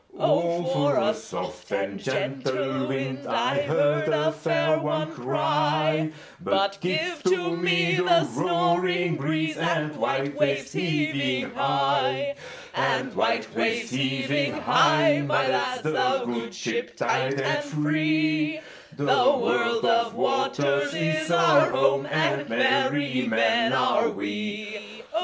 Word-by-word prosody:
"O 170 0 +1
for 145 -5 +1
a - - +2
soft - - -8
and 100 0 -3
gentle 135 0 -2
wind!"I 135 +1 -1
heard 150 +1 +1
a 155 0 +1
fair 155 0 0
one 155 0 -2
cry:But 155 +8 -1
give 320 - -1
to 180 -2 +1
me 175 0 +2
the 175 -2 +4
snoring 175 +1 0
breezeAnd 155 +1 -1
white 135 +2 -1
waves 140 -2 -1
heaving 150 -6 -1
high; 140 - 0 0.4
And - - -1
white - - 0
waves 225 0 -1
heaving 135 +2 0
high, 150 -2 +3
my 145 -2 +1
lads, 255 - -1
The 255 +12 0
good 115 -1 -5
ship - - -4
tight 135 +1 0
and 295 - 0
free—The 155 - -1
world 235 - +2
of 230 0 +2
waters 145 - 0
is 155 0 -1
our 170 0 +4
home, 135 +1 +1
And 150 -2 0
merry 200 - +1
men 225 - +2
are 220 +2 +2
we. 210 0 -6
155 Hz, 110 wpm, -25 LUFS, 140-180 Hz, 0.4 s, the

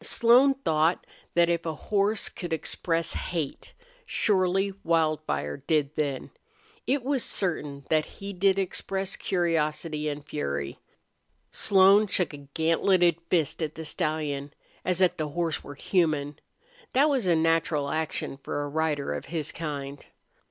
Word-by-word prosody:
Slone 250 +5 +5
thought 160 - +1 0.3
that 170 0 +5
if 170 -1 0
a 160 -2 -3
horse 205 +5 0
could 175 -3 -7
express 165 +1 -1
hate, 165 -6 -4 0.3
surely 195 - +1
Wildfire 155 - 0
did 150 -3 0
then. 145 -4 -2 0.6
It 270 0 +1
was 270 -1 0
certain 150 -7 -2
that 155 -1 +3
he 200 0 -6
did 195 +1 +2
express 195 0 -2
curiosity 155 -3 -1
and 145 0 -6
fury. 70 -1 -3 0.7
Slone 200 +2 +5
shook 180 -4 0
a - - -7 0.2
gantleted 170 +1 +3
fist 165 -2 +1
at 155 -1 -3
the 160 - -7
stallion, 150 -2 -2 0.3
as 180 0 0
if 185 - +3
the 155 - -2
horse 165 +1 -2
were 145 - -9
human. 150 -4 0 0.5
That 275 +4 +5
was 265 -9 +1
a 170 - +4
natural 160 -3 +1
action 155 -3 -2
for 145 - -3
a 145 - -4
rider 150 -1 -1
of - - -5
his 160 -4 -3
kind. 145 -3 -5
165 Hz, 140 wpm, -27 LUFS, 150-190 Hz, 0.7 s, Slone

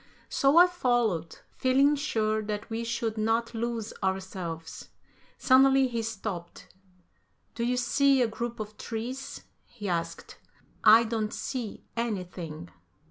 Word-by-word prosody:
So 275 +3 +3
I 350 - +10
followed, 240 - 0
feeling 275 +3 +3
sure 220 -7 0
that 210 +1 -5
we 225 +1 -2
should 230 -1 -2
not 225 +2 0
lose 230 -1 -3
ourselves. 185 -4 -4 0.5
Suddenly, 265 0 +5
he 235 -1 -2
stopped. 205 -6 -6 0.8
"Do 235 - -3
you 250 +1 +1
see 270 +3 +3
a - - +2
group 235 +1 -5
of 215 0 -7
trees?" 245 +4 -5 0.2
he 210 -4 -8
asked. 165 -2 -4 0.4
"I 220 +2 +8
don't 220 -2 -2
see 245 -6 -5
anything." 180 -8 -4
225 Hz, 125 wpm, -28 LUFS, 205-245 Hz, 0.8 s, I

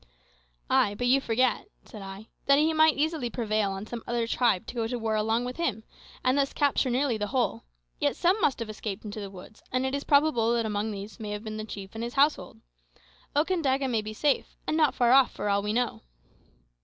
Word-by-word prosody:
"Ay, 205 - +3
but 245 - -2
you 265 +2 +4
forget," 255 - +1 0.2
said 215 - -10
I, 195 +2 -9 0.2
"that 280 0 +6
he 315 +2 +3
might 315 -1 +4
easily 305 -4 0
prevail 215 -3 0
on 195 +1 -5
some 235 +1 -6
other 235 -1 0
tribe 230 -5 +1
to - - -7
go 230 -2 -1
to 245 +1 -3
war 225 -1 -1
along 220 +3 +1
with 250 0 -5
him, 245 -11 -1 0.4
and 255 +1 +3
thus 280 -1 +1
capture 285 -2 +2
nearly 250 -1 +1
the 210 - -1
whole. 240 - -1 0.3
Yet - - +1
some 375 +5 +2
must 275 - +2
have 230 - -4
escaped 210 -1 -6
into 210 +1 -6
the 200 -1 -6
woods, 195 +3 -13
and 255 +1 0
it 265 - -2
is 280 0 -2
probable 280 -6 +3
that 230 -1 0
among 210 0 -1
these 200 -1 -7
may 215 -2 -5
have 210 +1 -4
been 215 -1 -5
the 215 - -4
chief 195 -3 -8
and 225 +1 -5
his 240 0 -5
household. 290 +2 +1 0.7
Okandaga 290 -4 +1
may 230 -4 0
be 215 0 -6
safe, 280 +6 0
and 310 - -1
not 305 -4 +3
far 240 -1 +3
off, 265 0 +6
for 210 - -3
all 200 0 +2
we 210 +1 -2
know." 240 +2 -1
235 Hz, 225 wpm, -27 LUFS, 215-275 Hz, 0.7 s, that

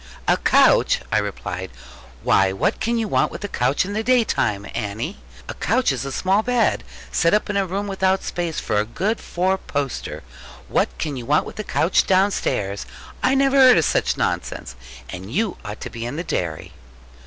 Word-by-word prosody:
'A - - +4
couch!' - - +4
I 110 - +3
replied: 95 -2 -4 0.5
'why 95 -1 +4
what 95 - 0
can 235 +1 0
you 225 -1 -1
want - - +1
with - - -8
a - - -2
couch 130 -1 +1
in 200 - -5
the 215 - 0
day 245 +1 +4
time, 100 - -1
Annie? 110 - -4 0.3
A - - -5
couch 255 - +1
is 135 -1 -3
a 135 - -4
small 190 +8 +2
bed, 245 -1 +1 0.3
set 170 +4 +3
up 210 0 0
in - - -4
a 195 -1 +1
room 195 +3 -2
without 190 -1 +1
space 170 -2 -3
for 105 - 0
a - - +2
good 195 - -2
four 190 +2 -1
poster. 140 -6 -4 0.5
What - - +2
can 150 -4 -3
you 120 - -7
want 150 +2 +3
with - - -10
a - - -2
couch 175 - +2
downstairs? 185 - +1 0.3
I 260 +1 +3
never 275 0 +3
heard 255 -2 +8
of 160 - +3
such - - +1
nonsense. - - -2 0.3
And 90 +9 -8
you 205 - -1
ought 105 -2 -7
to - - -6
be 115 0 -5
in 120 - -5
the 170 - -3
dairy.' 85 - -3
175 Hz, 200 wpm, -22 LUFS, -, 0.5 s, heard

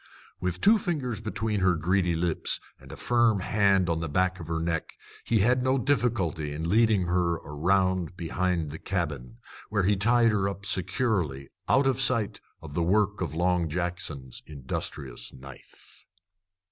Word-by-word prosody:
With 90 -1 -3
two 215 +1 +5
fingers 135 - -2
between 110 0 -2
her 90 -2 +3
greedy 90 +1 +1
lips 85 -1 -1 0.2
and - - -13
a - - -7
firm 120 -4 +2
hand 100 -2 +2
on 85 -1 0
the 80 -2 -3
back 90 +4 +1
of 80 - -8
her 80 0 -1
neck, 80 -1 -3 0.3
he 115 -3 +2
had 125 +4 +3
no 130 +1 +2
difficulty 110 - 0
in 80 +3 -3
leading 110 -1 +4
her 85 -1 +1
around 90 +3 0
behind 85 -2 -1
the 80 - -7
cabin, 75 -10 -3 0.3
where 100 -2 +1
he 100 +3 +3
tied 115 +3 +4
her 100 -2 +1
up 100 0 -8
securely, 95 - -1 0.2
out 135 +1 +4
of 135 -1 +2
sight 115 -6 +1 0.2
of 75 -3 -9
the 85 - 0
work 105 +4 +1
of 85 -3 -3
Long 90 -1 +1
Jackson's 80 -6 -4
industrious 65 -3 -5
knife. 65 0 -14
90 Hz, 160 wpm, -27 LUFS, 80-105 Hz, 0.3 s, two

